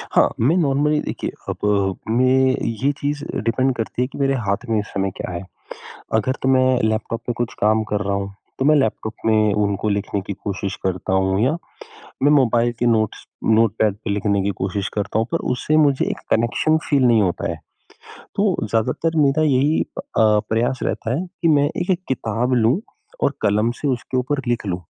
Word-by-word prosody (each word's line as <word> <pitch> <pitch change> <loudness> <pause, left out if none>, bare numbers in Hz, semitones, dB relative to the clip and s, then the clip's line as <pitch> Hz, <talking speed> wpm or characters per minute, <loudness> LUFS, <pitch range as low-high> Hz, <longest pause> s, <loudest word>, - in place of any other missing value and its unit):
हाँ, - - +5
मैं 140 +10 +3
नॉर्मली 150 -1 +2
देखिए, - - -4 0.2
अब 100 -2 0
मैं 130 +2 +3 0.3
ये 140 - +4
चीज़ 145 +1 -2
डिपेंड 125 +3 0
करती 115 +1 -3
है 125 - +1
कि - - -11
मेरे 135 -1 +1
हाथ 100 +5 -1
में 110 -2 +2
इस 105 - -4
समय 95 -1 -1
क्या - - -5
है, 85 +2 -5 0.7
अगर 110 +4 +2
तो 130 - +1
मैं 130 -1 +4 0.2
लैपटॉप 110 +1 -1
में 120 - 0
कुछ 120 -1 -2
काम 110 +1 +3
कर 105 - +1
रहा 100 0 0
हूँ, 100 0 -4 0.2
तो 130 - 0
मैं 150 +1 +5
लैपटॉप 110 -3 0
में 110 -2 +3
उनको 105 0 0
लिखने 100 0 -1
की 100 - -3
कोशिश 100 -1 -3
करता 95 0 -2
हूँ 95 +1 +2
या 145 +6 +1 0.7
मैं 145 - +5
मोबाइल 120 -4 +3
के 120 - +1
नोट्स 110 -3 +1 0.2
नोटपैड 110 -2 +2
पे - - -2
लिखने 100 -1 +1
की 100 - 0
कोशिश 95 +1 -2
करता 105 +1 -1
हूँ 115 - 0
पर - - +2
उससे 150 +4 0
मुझे 145 -3 +3
एक - - -3
कनेक्शन 120 +7 +2
फील 140 -3 +3
नहीं 115 -3 +5
होता 90 -3 -1
है। - - -7 0.8
तो 200 -2 +2
ज़्यादातर 140 +9 0
मेरा 145 +2 +3
यही 145 +2 +2
अ, - - -5 0.3
प्रयास 110 +3 +2
रहता 115 +3 -2
है 175 - -2 0.2
कि 170 - +3
मैं 145 -3 +4 0.2
एक 180 - -4
एक 180 0 0
किताब 120 0 -1
लूँ, 120 - +3 0.4
और - - +2
कलम 105 +3 +2
से 145 - 0
उसके 130 0 -2
ऊपर 135 +3 -1
लिख 120 -3 -1
लूँ 90 -2 -2
115 Hz, 195 wpm, -21 LUFS, 105-135 Hz, 0.8 s, हाँ